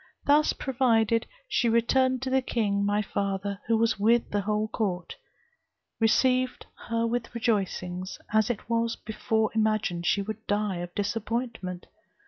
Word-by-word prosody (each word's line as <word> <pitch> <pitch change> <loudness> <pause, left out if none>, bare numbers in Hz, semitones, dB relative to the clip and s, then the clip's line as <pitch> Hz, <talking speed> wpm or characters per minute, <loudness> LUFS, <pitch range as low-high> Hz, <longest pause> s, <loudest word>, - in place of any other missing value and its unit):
Thus 295 +1 +4
provided, 230 -4 +1 0.2
she 240 - +1
returned 255 +3 +2
to 260 - -2
the 265 0 +3
king, 205 -5 0
my 205 +1 +1
father, 200 0 -2
who 225 0 +3 0.2
with 230 +3 +3
the 205 - +1
whole 210 +2 0
court, 190 -6 -3 0.8
received 255 +3 +2 0.2
her 230 0 +1
with 240 +1 -2
rejoicings, 190 -5 -1 0.2
as 220 0 +3
it 230 -4 -3
was 230 0 0
before 220 0 -1
imagined 215 -6 0
she 200 - +2
would 220 +2 -7
die 205 -2 0
of 175 0 -6
disappointment. 220 -3 -3
220 Hz, 135 wpm, -27 LUFS, 200-235 Hz, 0.8 s, Thus